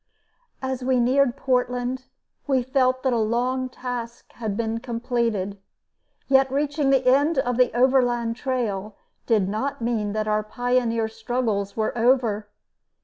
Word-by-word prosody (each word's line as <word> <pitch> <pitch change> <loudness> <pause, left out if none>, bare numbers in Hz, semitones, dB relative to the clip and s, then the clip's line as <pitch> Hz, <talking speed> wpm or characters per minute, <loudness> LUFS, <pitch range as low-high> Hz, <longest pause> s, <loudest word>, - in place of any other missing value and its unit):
As 260 -1 -3
we 255 0 +2
neared 255 +1 +2
Portland 250 0 -1 0.4
we 265 -3 +2
felt 260 0 +1
that 260 -2 +2
a 235 - +1
long 250 +4 0
task 245 -2 -6
had 215 -4 -4
been 225 0 -1
completed. 230 -5 -2 0.7
Yet 265 -1 +4
reaching 290 0 0
the 265 -2 +3
end 285 +5 +3
of 245 -2 0
the 250 -1 +4
Overland 245 -3 +2
Trail 215 -6 -3 0.3
did 215 -5 +3
not 220 +8 -2
mean 225 -3 -1
that 215 0 -1
our 215 0 +2
pioneer 235 0 0
struggles 220 -3 -2
were 220 +1 -1
over. 230 -4 +2
245 Hz, 140 wpm, -24 LUFS, 225-260 Hz, 0.7 s, Yet